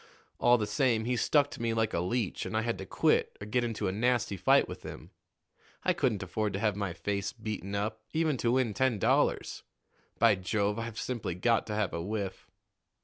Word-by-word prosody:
All 120 0 +5
the 105 - -1
same, 110 +1 +1
he 125 +1 +1
stuck 145 +4 +3
to - - -8
me 115 -1 0
like 110 -1 0
a - - +1
leech, 100 +4 -1
and 110 - -2
I 110 - +1
had 115 0 -2
to 95 - -7
quit - - +1
or 105 - -6
get 120 +4 0
into 115 -2 -2
a - - 0
nasty 120 0 +1
fight 95 - +4
with - - -8
him. - - -9 0.7
I - - +3
couldn't 110 -7 0
afford 100 +3 -2
to 100 - -2
have 105 -2 +1
my 100 -3 -2
face 100 +2 -2
beaten 105 -4 -5
up, 110 +2 -2
even 160 -2 +1
to 120 0 +1
win 125 -4 +1
ten 130 0 +1
dollars. - - +1 0.6
By - - +5
Jove! 100 +3 -1
I've 115 -1 -5
simply 115 -9 -3
got 115 +5 +1
to 105 - -3
have 105 -2 0
a 85 - -2
whiff." 100 0 -4
110 Hz, 210 wpm, -30 LUFS, 100-120 Hz, 0.7 s, All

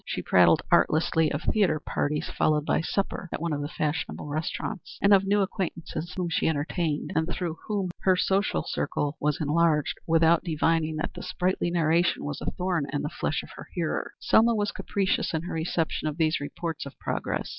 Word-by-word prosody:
She - - -3
prattled - - +5
artlessly 160 0 +3
of 145 +2 -3
theatre 195 -8 +2
parties 150 0 -2
followed 150 -1 +1
by - - +2
a - - -3
supper 195 -1 -2
at - - -3
one 165 -1 -1
of 145 - -2
the 145 - -2
fashionable 150 0 -3
restaurants, 155 +4 -4
and 200 +1 +5
of 195 0 +5
new 205 +1 +3
acquaintances 175 -3 -4
whom 180 -1 0
she 165 - 0
entertained, 155 0 -1
and 160 +1 +1
through 170 -2 -3
whom 200 -4 -1
her 185 -1 +3
social 195 +2 +1
circle 145 +1 -1
was 150 0 +1
enlarged, 155 0 +2
without 165 0 +4
divining 160 -1 +1
that 155 - -3
the - - -8
sprightly 180 -1 -1
narration 170 +1 +2
was 145 0 -4
a - - -1
thorn 180 -5 -1
in 145 - -2
the 150 - -2
flesh - - -2
of - - -12
her - - -10
hearer. - - -2
Selma 230 +1 +4
was 205 -1 0
capricious 195 -4 -1
in 160 - -2
her 175 - -5
reception 165 -1 -1
of 150 0 -3
these 160 -1 +2
reports 160 +1 -4
of 140 - -12
progress. - - -3
165 Hz, 195 wpm, -27 LUFS, 155-180 Hz, -, prattled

